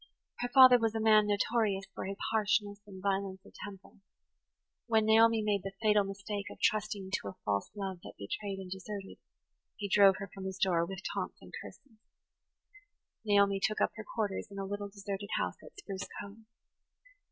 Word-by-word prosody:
Her 245 - -2
father 255 -1 +9
was 225 -1 0
a - - 0
man 215 -1 +5
notorious 205 -1 +1
for - - -5
his 195 0 -4
harshness 205 -1 +1
and 190 -2 -11
violence 195 -1 -1
of - - -16
temper. 200 -1 -10 0.9
When 220 -2 +3
Naomi 225 0 +5
made 205 -2 +1
the 195 +1 -6
fatal 210 -2 +4
mistake 200 +1 -5
of - - -11
trusting 210 -3 0
to 100 - -2
a 100 - -6
false 100 -1 0
love 190 -3 -4
that - - -10
betrayed 195 - -4
and 190 -1 -8
deserted, 195 +1 -6 0.6
he 205 - -3
drove 195 -1 +6
her 200 - -7
from 190 -1 -7
his 190 0 -4
door 170 -3 +2
with 190 +1 -7
taunts - - -3
and - - -15
curses. 225 -6 -14 1.2
Naomi 200 -2 +4
took 215 +1 +1
up - - +2
her 215 -1 -8
quarters 210 -4 -1
in 200 - -10
a 195 - -3
little 205 +1 -4
deserted 200 0 -6
house - - -1
at - - -14
Spruce 195 - -6
Cove. 205 +2 -10
200 Hz, 180 wpm, -32 LUFS, 195-215 Hz, 1.2 s, father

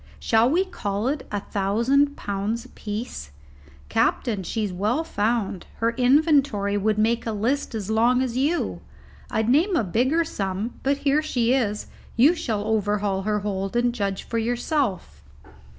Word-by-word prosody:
Shall 225 +2 +3
we 360 +7 +2
call 205 - -3
it 290 0 -3
a 205 -1 -2
thousand 235 +10 +1
pounds 205 +4 -3
apiece? 215 - -6 0.6
Captain, 210 - +1
she's 205 +1 -2
well 215 - 0
found: 210 - -1
her 230 +1 +1
inventory 260 -5 +3
would 210 +1 +1
make 230 +2 +1
a - - 0
list 230 +4 -1
as 210 -1 -3
long 240 +3 +3
as 245 -2 -3
you; 290 +7 0 0.5
I'd 220 0 0
name 325 - +3
a 245 - +2
bigger 255 - +1
sum, 200 - -3
but 275 +1 +1
here 285 +2 +4
she 250 -6 +1
is, 210 -6 0 0.3
you 275 +9 +6
shall 225 - -2
overhaul 205 -2 0
her 210 +1 -1
hold 195 0 -3
and 240 0 +2
judge 200 -4 -2
for 230 - -2
yourself." 230 - -2
225 Hz, 150 wpm, -24 LUFS, 205-260 Hz, 0.6 s, you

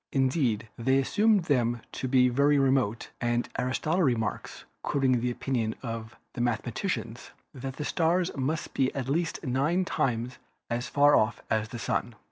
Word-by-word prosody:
Indeed, 130 -5 +1
they 130 +3 +3
assumed 205 +8 +3
them 120 -6 +1
to 130 - -4
be 125 -1 +4
very 140 +4 +3
remote, 130 -5 +1
and 120 0 0
Aristotle 155 +8 0
remarks, 115 - -1 0.2
quoting 130 -4 +1
the 125 - 0
opinion 120 -3 -2
of 115 -2 -5 0.2
"the 120 - -4
mathe 120 -3 0
maticians," 120 - -4 0.2
that 135 -1 -6
the 150 - -4
stars 175 +2 +1
must 150 +4 -2
be 130 -1 +1
at 135 -2 -3
least 165 +5 -1
nine 145 +9 +1
times 125 -7 -1 0.3
as 120 +1 -1
far 145 +1 +5
off 110 +2 +1
as 110 0 +1
the 120 - -6
Sun. 115 0 -2
130 Hz, 160 wpm, -28 LUFS, 120-145 Hz, 0.3 s, far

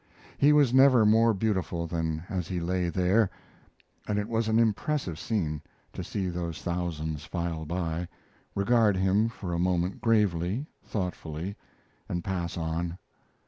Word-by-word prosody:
He 145 - +6
was 145 -5 +5
never 130 -4 +7
more 115 +2 +5
beautiful 95 -5 -1
than 80 -1 -2
as 90 -4 -3
he 90 -2 -2
lay 90 +1 0
there, 95 +4 +3 0.8
and 105 - 0
it 105 0 -1
was 115 -1 0
an 110 0 +3
impressive 115 - 0
scene 80 -10 -1 0.3
to - - -5
see 95 -3 -2
those 85 -2 -3
thousands 80 -4 -2
file 85 -2 -3
by, 85 0 -2 0.5
regard 105 -1 +3
him 95 +4 +3
for 95 -6 -5
a 85 - 0
moment 90 +1 0
gravely, 105 - +2 0.2
thoughtfully, 90 -2 -4 0.5
and 85 -1 -2
pass 90 -3 -3
on. 85 +1 -2
90 Hz, 140 wpm, -28 LUFS, 85-110 Hz, 0.8 s, never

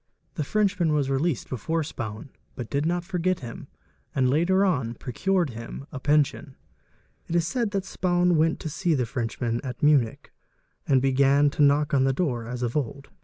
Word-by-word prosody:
The 150 - -2
Frenchman 195 0 +1
yas 145 -3 +1
released 135 0 0
before 160 +7 -2
Spaun, 110 -3 -6 0.3
but 120 -3 -7
did 145 +2 0
not 175 +1 0
forget 180 -1 -1
him 120 -2 -8 0.5
and 130 -2 +3
later 185 +6 +3
on 125 -11 0
procured 175 +6 -1
him 115 +4 -8
a 140 - -6
pension. 145 -1 +1 0.7
It 170 - -3
is 170 -2 +2
said 235 +3 -1
that 195 -2 -2
Spaun 175 -1 +1
went 160 +1 +2
to - - -4
see 170 +1 0
the 125 -3 0
Frenchman 115 0 -2
at 125 -1 -6
Munich 140 -7 +2 0.5
and 135 -2 +3
began 140 +2 +4
to 150 - -2
knock 145 +1 +3
on 135 -2 +4
the 135 - +2
door 125 -7 -1
as 125 0 -4
of 120 -1 -2
old. 140 0 -3
145 Hz, 180 wpm, -25 LUFS, 130-170 Hz, 0.7 s, began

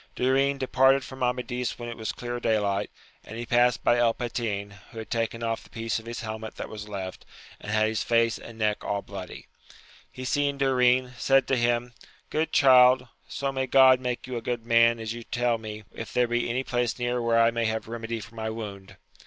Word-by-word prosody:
Durin 135 +2 +2
departed 135 +1 +3
from 130 0 -10
Amadis 125 0 -1
when 120 - -7
it 120 - -5
was 110 -2 -3
clear 120 0 -5
day 110 -2 +2
light, 100 -1 -1 0.3
and 110 - -9
he 120 - -4
passed 120 +1 +2
by 120 - +3
El 115 -1 +3
Patin, 110 -4 -3 0.2
who - - -13
had 110 - -7
taken 115 0 -1
oiF 115 -1 -2
the - - -18
piece 115 0 -3
of 110 - -14
his 115 0 -5
helmet 110 -1 -6
that - - -6
was 105 -1 -8
left, 95 -2 -6 0.4
and 105 - -7
had 110 0 +3
his 110 0 -1
face 115 -1 +2
and 115 - -11
neck 105 -1 0
all 100 -1 -2
bloody. - - -8 0.7
He 130 - -8
seeing 140 +1 0
Durin, 130 -2 +3
said 135 -1 +4
to 135 - +3
him, 120 0 0 0.4
Good 160 +1 0
child, 130 -2 +6 0.2
so 140 -1 -3
may 130 -1 -2
God 130 -1 +6
make 125 -1 -3
you 125 -1 -4
a - - -4
good 115 0 -3
man 115 0 +4
as 110 0 -4
you 120 - -7
tell 120 0 -1
me 110 -1 -7
if 115 - -8
there 125 -1 +2
be 120 0 -1
any 125 +3 -1
place 120 -2 -1
near 120 0 -1
where 115 0 +2
I 115 0 +5
may 115 0 -1
have 110 0 -2
remedy 115 0 -5
for 115 +1 -12
my 110 -1 -4
wound. 100 -3 -8
120 Hz, 220 wpm, -26 LUFS, 110-125 Hz, 0.7 s, child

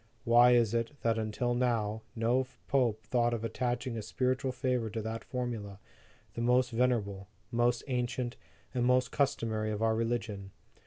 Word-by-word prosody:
Why 120 0 +6
is 120 -3 +3
it, 115 +5 -2
that 115 -1 +2
until 110 +3 -1
now, 115 -3 0
no 120 +3 +1 0.2
Pope 120 -6 +1
thought 120 -1 +1
of 115 - -5
attaching 120 +1 -2
a 110 - -3
spiritual 130 +4 -1
favor 125 -3 -1
to 110 - -4
that 110 +1 -4
formula, 115 -6 -4 0.6
the 115 - -4
most 125 +1 +3
venerable, 110 -5 0 0.2
most 120 0 +2
ancient, 125 -1 -2 0.4
and 125 -2 0
most 125 0 +3
customary 110 -6 0
of 105 +1 -2
our 110 0 +3
religion? 115 -4 -2
120 Hz, 155 wpm, -31 LUFS, 110-125 Hz, 0.6 s, Why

